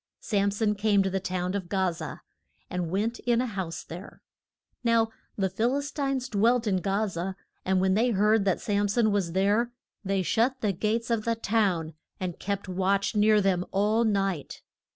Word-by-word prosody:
Sam 200 -2 +1
son 210 +1 +1
came 205 -1 +2
to 190 - -1
the 190 - 0
town 185 -1 -2
of 190 -4 -3
Ga 190 -2 +1
za, 165 - -7 0.5
and 180 -3 -2
went 215 +6 -1
in 240 -1 +1
a 255 - +1
house 190 -7 -4
there. 175 +5 -10 0.6
Now 230 -1 +3 0.3
the 195 -2 +2
Phil 230 +8 0
is 285 0 -4
tines 275 -4 -1
dwelt 230 +3 +2
in 200 -3 +2
Ga 200 +3 +1
za, 185 -1 -4 0.3
and 190 0 +2
when 190 0 +2
they 230 +5 +3
heard 210 0 +3
that 190 -3 +2
Sam 205 -1 +1
son 215 +1 +2
was 190 -5 0
there 205 +6 +2 0.3
they 195 -1 0
shut 245 +8 +1
the 210 -3 +1
gates 225 +5 -1
of 225 -2 +1
the 230 +1 0
town, 195 -8 0 0.3
and 180 -2 -4
kept 200 -1 -3
watch 190 +3 0
near 210 0 +5
them 190 -2 +1
all 210 +4 +2
night. 195 -7 -1
200 Hz, 190 wpm, -27 LUFS, 190-225 Hz, 0.6 s, near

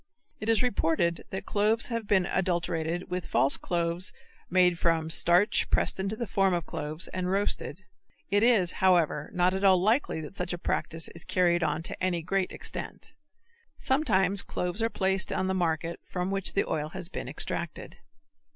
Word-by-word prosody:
It 215 - -3
is 225 +1 +3
reported 170 -7 +1
that 190 +1 -5
cloves 215 +3 +1
have 230 -3 -3
been 190 -3 +3
adulterated 175 -1 -1
with 180 -1 -3
false 135 - +2
cloves 170 +1 -1 0.4
made 180 -1 +3
from 165 -1 +1
starch 175 +6 +3
pressed - - +1
into 195 +3 -2
the 235 - -3
form 195 -2 +2
of 170 -2 -3
cloves 155 +3 -4
and 185 0 -3
roasted. 195 -2 -1 0.5
It 205 0 +3
is, 215 -7 +4
however, 170 -5 +2
not 180 +1 +2
at 190 +1 -2
all 190 -2 +6
likely 215 - +1
that 155 +5 -9
such 180 -2 -3
a - - -3
practice 165 -1 -1
is 170 - -7
carried 175 -1 +2
on 155 0 0
to 175 - -6
any 175 -3 0
great 195 +2 0
extent. - - -5 0.6
Sometimes 200 - +2
cloves 180 +4 -3
are 225 - +2
placed 190 -2 0
on - - 0
the 190 - 0
market 170 -2 -1
from 180 +1 -3
which 195 -1 0
the 200 - +1
oil 150 -1 -2
has 170 - -6
been - - -6
extracted. - - -4
180 Hz, 175 wpm, -28 LUFS, 170-195 Hz, 0.6 s, all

